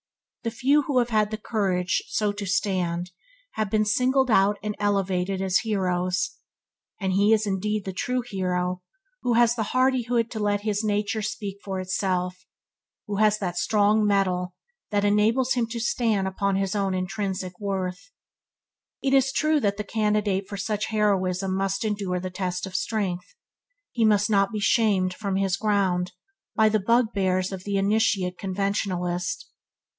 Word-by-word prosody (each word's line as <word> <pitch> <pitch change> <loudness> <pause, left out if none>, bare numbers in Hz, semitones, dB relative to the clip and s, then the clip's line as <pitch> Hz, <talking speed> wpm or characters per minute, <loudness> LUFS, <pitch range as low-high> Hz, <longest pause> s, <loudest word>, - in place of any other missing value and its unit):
The 230 - 0
few 270 +6 +2
who 280 -3 +1
have 240 -1 +2
had 215 -2 +2
the 215 - -4
courage 185 -5 0
to - - -11
so 210 -1 0
stand, 180 -2 -1 0.4
have 215 -2 -2
been 215 +1 +2
singled 255 +4 +2
out 205 0 +4
and 210 -1 -3
elevated 195 -2 0
as 190 -1 +2
heroes; 185 -4 -1 0.6
and 190 -2 -1
he 200 +3 +3
is 220 -1 +3
indeed 205 +1 -1
the 190 - -4
true 250 +7 -1
hero 180 -3 -2 0.4
who 245 - +1
has 235 0 +4
the 235 - -3 0.2
hardihood 245 -3 +2
to 220 - -4
let 205 -1 +1
his 210 0 -1
nature 210 +1 0
speak 210 -2 -4
for 190 -1 -3
itself, 185 -1 -2 0.6
who 205 -1 -3
has 215 0 +4
that 180 -4 -3
strong 210 0 +3
metal 185 -3 +1 0.3
which 205 -1 +1
enables 220 +5 +3
him 240 -2 0
to 235 +1 -5
stand 225 -4 +1
upon 195 +1 0
his 195 +1 -1
own 195 -2 0
intrinsic 185 -1 -3
worth. 190 - -3 0.9
It 270 -1 +1
is 270 -1 +4
true 310 +2 +2
that 200 -5 0
the 210 - -2
candidate 210 -2 0
for 200 - -5
such 210 +1 -2
heroism 195 -3 +1
must 195 +2 -1
endure 200 -4 -1
the 185 +1 -5
test 180 0 -3
of 190 - -9
strength. 190 -5 -2 0.6
He 235 - 0
must 210 0 +3
not 195 0 +3
be 215 - -3
shamed 205 -4 +2
from 200 0 -3
his 195 -1 +1
ground 195 -4 0 0.4
by 220 -1 +5
the 215 0 +2
bugbears 195 -4 +1
of 190 -1 -5
an 200 - -1
initiate 195 -3 +1
conventionalist. 185 -2 -2
200 Hz, 160 wpm, -25 LUFS, 185-215 Hz, 0.9 s, by